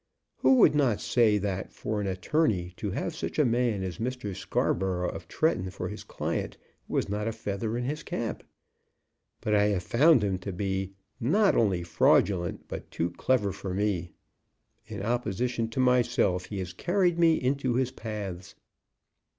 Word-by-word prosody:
Who 265 - +5
would 240 - +6
not 135 -8 +2
say 110 -4 +3
that 95 -2 -3
for 105 -1 -3
an 100 - -2
attorney 95 - 0
to - - -3
have - - -3
such - - -4
a 150 - +4
man 120 -4 +1
as 90 -3 -5
Mr. 120 -4 -3
Scarborough, 95 -2 0
of - - -9
Tretton, 155 - 0
for - - -5
his - - -7
client, - - -3 0.3
was - - 0
not 105 +2 -2
a - - 0
feather 110 +1 -3
in 120 - -2
his 150 +4 -3
cap? 115 -2 -4 1.0
But 105 - 0
I 105 0 +4
have 100 -4 0
found 140 0 +5
him 95 -2 0
to 100 +2 -5
be 95 +1 -2 0.3
not 195 - +3
only 95 -6 +2
fraudulent, 85 +1 +2
but - - -7
too 85 +1 -2
clever 105 +1 +1
for 95 -1 -5
me. 95 -4 0 0.8
In 105 -3 -6
opposition 120 0 -1
to 115 - -5
myself 125 -7 +2
he 105 - -6
has 90 -2 -4
carried 175 -2 +1
me 165 -1 +5
into 130 -2 0
his 130 0 +1
paths." 100 -6 -6
105 Hz, 165 wpm, -28 LUFS, 95-125 Hz, 1.0 s, would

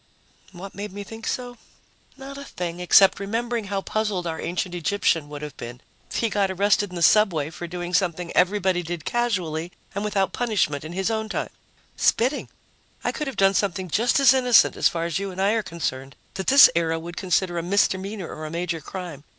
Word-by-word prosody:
What 190 +2 -9
made 205 0 -6
me 205 +1 -7
think 225 +2 -9
so? 245 -1 -3 0.6
Not 275 +1 -9
a 280 - -8
thing 175 -8 -5
except 190 +2 +5
remembering 230 +3 -2
how 195 0 -2
puzzled 210 -4 -2
our 160 -1 -3
ancient 180 +1 -3
Egyptian 170 -3 0
would 150 0 -7
have 150 -2 -7
been 120 +1 -8 0.3
if - - -8
he 230 - +1
got 200 -2 +1
arrested 200 +2 +2
in 180 - -10
the 170 - -1
subway 165 -9 +4
for 175 +1 -7 0.3
something 175 -1 0
everybody 185 -1 +2
did 170 -2 -6
casually 180 -9 -1 0.2
and 200 +1 -3
without 195 -3 0
punishment 205 - 0
in 155 +2 -7
his 190 +4 -1
own 220 -1 -2
time - - -3 0.5
spitting! 255 +5 +1 0.5
I - - 0
could 300 - -4
have 270 - -5
done 195 0 +4
something 190 -2 -1
just 235 - +2
as 270 -2 +7
innocent, 250 -2 +4
as - - +3
far 165 -1 -3
as 170 +2 -1
you 200 0 -3
and 185 0 -8
I 195 +2 +3
are 225 0 +1
concerned, 135 -8 -5 0.2
that 190 0 -5
this 275 0 +9
era 165 -1 +1
would 170 +1 -8
consider 180 -1 0
a - - -2
misdemeanor 195 +1 0
or 155 0 -7
a - - -6
major 170 0 -3
crime. 175 -7 -7
190 Hz, 200 wpm, -24 LUFS, 170-210 Hz, 0.6 s, this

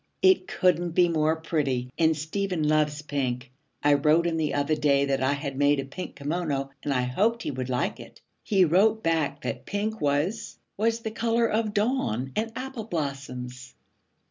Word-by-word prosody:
'It 375 -1 +5
couldn't 175 -2 +1
be 175 +1 +5
more 160 -1 +2
pretty, 140 -6 -1
and 160 -1 +3
Stephen 165 +1 -1
loves 150 -1 +1
pink. 130 -4 -3 0.3
I 145 0 +5
wrote 150 +4 +3
him 165 -1 0
the 155 -2 0
other 145 +2 +1
day 145 -2 +3
that 135 -1 0
I 130 +2 +2
had 140 -1 -4
made 145 +1 +3
a 135 - -3
pink 160 +7 -7
kimono 145 -2 -2
and 145 - -2
I 125 -2 +1
hoped 215 - +1
he - - -2
would 130 -1 -4
like 125 -1 -1
it. - - -12 0.2
He 195 -3 +3
wrote 210 +7 +3
back 160 -3 0
that - - -4
pink 215 +2 -2
was 150 +10 -1 0.2
was 225 +2 0
the 220 - -4
color 230 +1 +1
of 215 -1 0
dawn 205 - 0
and 225 +1 -1
apple 255 -3 -5
blossoms.' 130 - -5
155 Hz, 180 wpm, -26 LUFS, 140-200 Hz, 0.3 s, It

